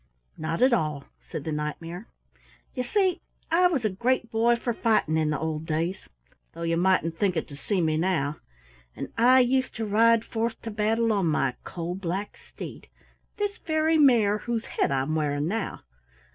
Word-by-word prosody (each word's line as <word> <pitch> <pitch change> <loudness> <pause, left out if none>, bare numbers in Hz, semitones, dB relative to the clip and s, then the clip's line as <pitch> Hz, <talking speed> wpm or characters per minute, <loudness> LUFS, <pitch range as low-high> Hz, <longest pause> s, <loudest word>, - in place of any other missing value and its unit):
"Not 165 +6 -1
at 255 -1 +5
all," 155 -9 0 0.3
said 150 - -5
the 160 - -3
Knight 150 0 -3
mare. 175 +6 -8 0.7
"You 250 - -2
see 375 - +1 0.3
I 355 +2 +5
was 285 -10 -1
a - - +3
great 235 +4 0
boy 230 +2 +3
for 235 0 -2
fighting 220 -9 +1
in 155 -1 +1
the 150 - 0
old 160 +1 -3
days 165 +4 -2 0.4
though 170 - -7
you 165 0 +1
mightn't 170 -2 +1
think 190 -4 +1
it 160 - -2
to 140 - -9
see 185 +6 -1
me 155 -1 +1
now 160 -4 0 0.6
and - - -5
I 255 +3 +6
used 255 +1 +1
to 225 - -2
ride 230 +2 +4
forth 230 0 -2
to 225 - -4
battle 220 +2 +1
on 195 -4 +1
my 140 -4 +1
coal 170 0 -5
black 190 +2 -4
steed, - - -10 0.5
this 410 -1 -2
very 315 0 +1
mare 225 -7 +5
whose 235 0 -3
head - - 0
I'm 135 +2 0
wearing 150 -1 0
now. 215 +3 -3
200 Hz, 185 wpm, -26 LUFS, 160-235 Hz, 0.7 s, I